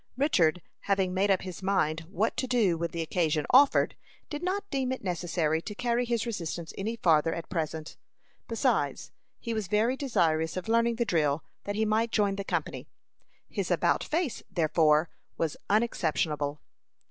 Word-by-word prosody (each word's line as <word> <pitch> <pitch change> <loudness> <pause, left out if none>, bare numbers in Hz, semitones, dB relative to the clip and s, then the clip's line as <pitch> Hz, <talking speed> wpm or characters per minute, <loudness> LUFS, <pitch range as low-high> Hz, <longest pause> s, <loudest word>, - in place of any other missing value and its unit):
Richard, 180 - +2 0.3
having 190 -2 +2
made 195 +2 +2
up 190 -2 +2
his 185 -1 -7
mind 165 -4 0
what 210 +3 0
to 260 - -1
do 230 -8 +2
when 170 +1 -2
the 165 0 -3
occasion 155 -3 0
offered, 275 +3 +5 0.4
did 295 0 -4
not 390 +3 -2
deem 265 -2 0
it 260 - -4
necessary 170 -3 0
to 210 +4 -7
carry 245 +1 0
his 235 -1 -1
resistance 170 -7 -4
any 220 +4 -3
farther 165 -6 +3
at 165 - -6
present. 160 -2 -3 0.5
Besides, - - 0 0.3
he 230 - -4
was 215 -4 -2
very 215 +6 +2
desirous 165 - +1
of 185 - -4
learning 230 +1 +2
the 235 +1 0
drill, 155 -6 +1 0.2
that 205 - -3
he 220 +1 +1
might 220 +2 +1
join 205 -2 +2
the 200 - -4
company. - - -3 0.6
His - - -3
"about - - +2
face," 320 -5 -1
therefore, 160 -2 +3 0.3
was 160 -3 -1
unexceptionable. 155 - 0
190 Hz, 165 wpm, -29 LUFS, 160-230 Hz, 0.6 s, offered